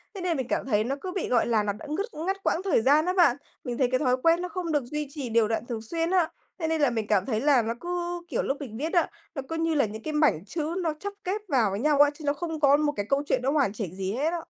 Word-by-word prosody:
Thế 380 - -5
nên 345 -4 0
mình 260 - -2
cảm - - 0
thấy 215 -5 +2
nó 265 +5 -2
cứ 370 - -4
bị, 375 - -2
gọi 245 - +3
là, 225 -3 +2
nó 205 -1 -1
đã 255 - -11
ngứt 370 +7 -1 0.2
ngắt 390 +1 -2
quãng 340 - +1
thời 365 - +2
gian 295 +6 +4
đó 365 - +1
bạn, 335 -9 +4 0.3
mình 240 -2 -4
thấy 255 -3 +2
cái 255 - +2
thói 255 -3 +2
quen 335 +1 +4
nó 360 - -3
không 350 -1 -3
được 295 -3 +1
duy 300 +2 -4
trì 275 -4 -5
đều 225 -1 +3
đặn 225 +1 -2
thường 235 -2 -4
xuyên 330 +9 -2
á. 355 -3 +3 0.3
Thế 320 - -1
nên 320 -1 0
là 285 - +5
mình 225 -3 -2
cảm 200 -3 +2
thấy 220 -3 -1
là 280 -3 +4
nó 230 +1 -2
cứ, 350 0 -3
kiểu, - - -1
lúc 275 - -1
mình 240 -7 -7
viết 310 +6 -3
á, 345 - +3 0.3
nó 275 - -2
cứ 325 - -3
như 325 -1 0
là 280 - +3
những 220 +1 -7
cái 310 - -3
mảnh 300 - +2
chữ 320 - -3
nó 320 -2 0
chắp 405 +3 -5
ghép 405 +3 -1
vào 245 - +2
với 195 - -2
nhau 295 +1 +2
á, 290 - +7
chứ 305 - -13
nó 285 - +3
không 320 +1 -4
có 285 -1 +5
một 295 -1 +1
cái 205 - -2
câu 280 +1 +2
chuyện - - +1
nó 270 - +2
hoàn 275 -9 +2
chỉnh 190 -5 -5
gì 190 0 -2
hết 290 +6 0
á. 340 -2 -3
290 Hz, 315 wpm, -27 LUFS, 235-330 Hz, 0.3 s, á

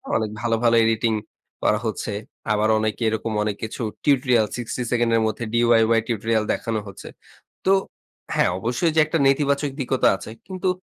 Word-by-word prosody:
অনেক 110 -1 0
ভালো, 115 -1 +1
ভালো 115 -1 +4
এডিটিং 115 0 +1 0.5
করা 105 - +3
হচ্ছে। 110 -1 -3 0.4
আবার 105 +1 +2
অনেকে 110 +1 -2
এরকম 110 +1 -3
অনেক 105 -1 -2
কিছু 110 +2 -5 0.2
টিউটোরিয়াল 125 -5 +3
60 120 +1 -4
সেকেন্ড 120 -1 +2
এর 115 - +3
মধ্যে 110 +2 -3
DIY 115 -1 +4
টিউটোরিয়াল 110 -1 0
দেখানো 115 -1 -2
হচ্ছে। 100 - -10 0.6
তো 190 - +4 0.6
হ্যাঁ, - - +3
অবশ্যই, 120 - 0
যে 160 - +4
একটা 165 +2 -1
নেতিবাচক 140 +1 +1
দিকও 130 0 -1
তো - - +7
আছে। 100 +3 -9 0.2
কিন্তু 185 0 -2
115 Hz, 165 wpm, -23 LUFS, 110-125 Hz, 0.6 s, তো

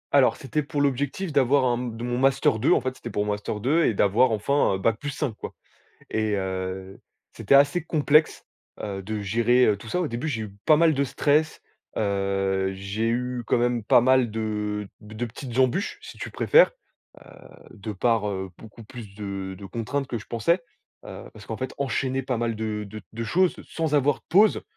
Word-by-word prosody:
Alors, - - +5
c'était 150 +3 -2
pour 145 0 -3
l'objectif 145 +6 -1
d'avoir 140 -1 +3
un 120 -2 +2
d 120 -2 -5
mon 120 0 -2
Master 130 -4 +2
2, - - +4
en - - +2
fait, 130 0 -4
c'était 120 - -7
pour 105 - -1
mon 105 - -1
Master 105 0 -4
2 155 +8 +2
et - - +2
d'avoir 105 +5 +3
enfin 110 -1 +1
BAC+5, 120 +5 -2
quoi. - - -7 0.6
Et 110 -1 0
heu, 95 0 -4 0.3
c'était - - +1
assez 145 +5 +4
complexe, 155 -1 +2 0.4
heu, 100 -2 -4
de 105 +2 -4
gérer, 120 +5 +3
heu, 105 - +3
tout 105 +3 -12
ça. 180 - -1
Au 170 - -1
début, 120 +4 -4
j'ai 125 -8 -2
eu 105 -2 -7
pas 155 - +6
mal 165 0 +4
de 140 +1 +1
stress, 150 +4 +1 0.3
heu, 95 -1 0
j'ai 100 +4 -2
eu 125 +1 -2
quand - - +2
même 120 -2 0
pas 115 - +6
mal 130 -2 +3
de 105 -2 -3
de 110 +2 -6
petites 120 +1 -8
embûches 130 - +1
si 450 +1 -11
tu - - -6
préfères, - - +5 0.5
heu, - - -17 0.4
de 105 -1 -7
par, 110 +1 +1
heu, 95 -1 -4
beaucoup 110 +1 -13
plus 110 -3 -11
de 100 -2 -5
de 100 - -11
contraintes 125 +6 -3
que 120 - -3
je 105 - -12
pensais, 120 - +1 0.5
heu, - - -9
parce 105 -2 -13
qu'en 110 - -4
fait 130 +2 -4
enchaîner 135 0 -1
pas 125 -2 -1
mal 115 -1 -1
de 110 -1 -3
de 105 +1 -8
de 115 +1 -4
choses 180 +8 +2
sans 160 -2 -2
avoir 145 -1 +3
de - - -24
pause, 205 +5 +4
115 Hz, 200 wpm, -25 LUFS, 105-140 Hz, 0.6 s, pas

